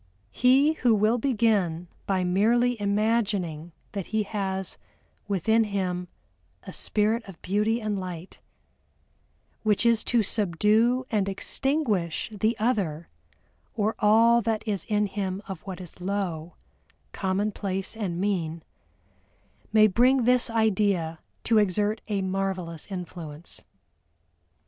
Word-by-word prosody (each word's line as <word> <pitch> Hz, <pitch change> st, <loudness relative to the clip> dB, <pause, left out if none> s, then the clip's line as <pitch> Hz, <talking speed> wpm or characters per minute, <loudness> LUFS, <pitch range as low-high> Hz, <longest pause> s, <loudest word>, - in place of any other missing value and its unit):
He 270 Hz, +5 st, +4 dB
who 240 Hz, -3 st, +4 dB
will 215 Hz, +4 st, +2 dB
begin 210 Hz, -9 st, +1 dB, 0.2 s
by 190 Hz, -2 st, +1 dB
merely 230 Hz, +7 st, +2 dB
imagining 200 Hz, -6 st, 0 dB, 0.2 s
that 200 Hz, -3 st, -5 dB
he 220 Hz, -1 st, 0 dB
has 190 Hz, -2 st, -4 dB, 0.5 s
within 220 Hz, +3 st, +2 dB
him 185 Hz, -3 st, -2 dB, 0.6 s
a 190 Hz, -, -9 dB
spirit 220 Hz, +2 st, 0 dB
of 190 Hz, -4 st, -11 dB
beauty 210 Hz, +4 st, +1 dB
and 210 Hz, -3 st, -2 dB
light, 180 Hz, -1 st, -7 dB, 1.2 s
which 215 Hz, +1 st, +1 dB
is 230 Hz, -1 st, +4 dB
to 235 Hz, -3 st, +2 dB
subdue 215 Hz, +6 st, +2 dB
and 200 Hz, -3 st, +1 dB
extinguish 215 Hz, -, -1 dB
the 215 Hz, +3 st, 0 dB
other 195 Hz, -9 st, -1 dB, 0.7 s
or 215 Hz, 0 st, +1 dB
all 230 Hz, +3 st, +5 dB
that 225 Hz, 0 st, -2 dB
is 200 Hz, -5 st, -1 dB
in 210 Hz, -1 st, +1 dB
him 195 Hz, -1 st, -3 dB
of 190 Hz, -, -6 dB
what 190 Hz, -1 st, -5 dB
is 180 Hz, -1 st, -11 dB
low, 180 Hz, -4 st, -3 dB, 0.6 s
commonplace, 195 Hz, 0 st, -2 dB
and 190 Hz, -6 st, -3 dB
mean, 170 Hz, -5 st, -1 dB, 1.1 s
may 215 Hz, 0 st, +6 dB
bring 245 Hz, +5 st, +4 dB
this 250 Hz, 0 st, +3 dB
idea 200 Hz, -7 st, +1 dB, 0.2 s
to 225 Hz, -2 st, +4 dB
exert 210 Hz, +2 st, +1 dB
a 200 Hz, -3 st, -1 dB
marvelous 185 Hz, -4 st, -3 dB
influence. 170 Hz, -4 st, -7 dB
205 Hz, 115 wpm, -26 LUFS, 185-225 Hz, 1.2 s, may